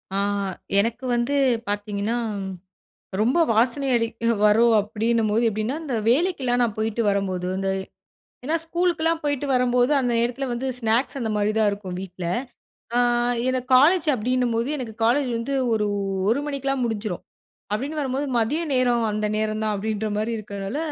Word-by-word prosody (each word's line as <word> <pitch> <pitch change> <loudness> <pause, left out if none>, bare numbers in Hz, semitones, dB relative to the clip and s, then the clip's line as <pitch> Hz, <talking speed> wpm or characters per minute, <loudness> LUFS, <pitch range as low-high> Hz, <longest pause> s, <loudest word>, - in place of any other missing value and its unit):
ஆ - - +1 0.6
எனக்கு 235 +5 -1
வந்து 240 +4 0 0.3
பாத்தீங்கன்னா, 205 +2 -2 1.0
ரொம்ப 250 +10 +2
வாசனை 245 +5 +2
அடிக்க 230 0 0
வரும், 230 +3 +5
அப்படின்னும்போது 220 +1 0
எப்படின்னா, 220 +7 -2
இந்த 270 -6 -3
வேலைக்கெல்லாம் 260 -4 +2
நான் 220 -3 0
போய்ட்டு 220 +1 0
வரும்போது 190 -2 -1
இந்த 195 0 -1 0.8
ஏன்னா 310 +4 +1
ஸ்கூலுக்குலாம் 330 -1 0
போயிட்டு 285 -1 -1
வரும்போது, 250 +1 +2
அந்த 250 -2 0
நேரத்தில 245 +3 -1
வந்து 260 +3 -3
ஸ்நாக்ஸ் 235 +4 +1
அந்த 225 - -2
மாரி 210 +1 +1
தான் 215 -2 +4
இருக்கும் 200 -3 -6
வீட்ல. 185 -1 -7 0.7
அ - - +4 0.5
எனக்கு 255 0 -1
காலேஜ் 325 +5 +5
அப்படின்னும்போது, 245 0 0
எனக்கு 235 -5 -6
காலேஜ் 260 +3 +2
வந்து 275 +4 -3 0.2
ஒரு 210 -1 +1 0.4
1 255 +5 +2
மணிக்கெல்லாம் 275 -2 -2
முடிஞ்சிரும். 215 -5 -3 0.5
அப்படின்னு 280 +8 -3
வரும்போது 275 0 -1
மதிய 250 +9 +1
நேரம் 245 -3 +2
அந்த 215 0 -1
நேரம் 215 0 -1
தான் 215 -1 0
அப்படின்ற 215 +1 -2
மாரி 215 +2 -1
இருக்கிறனால, 200 +2 -5
235 Hz, 145 wpm, -23 LUFS, 215-265 Hz, 1.0 s, வரும்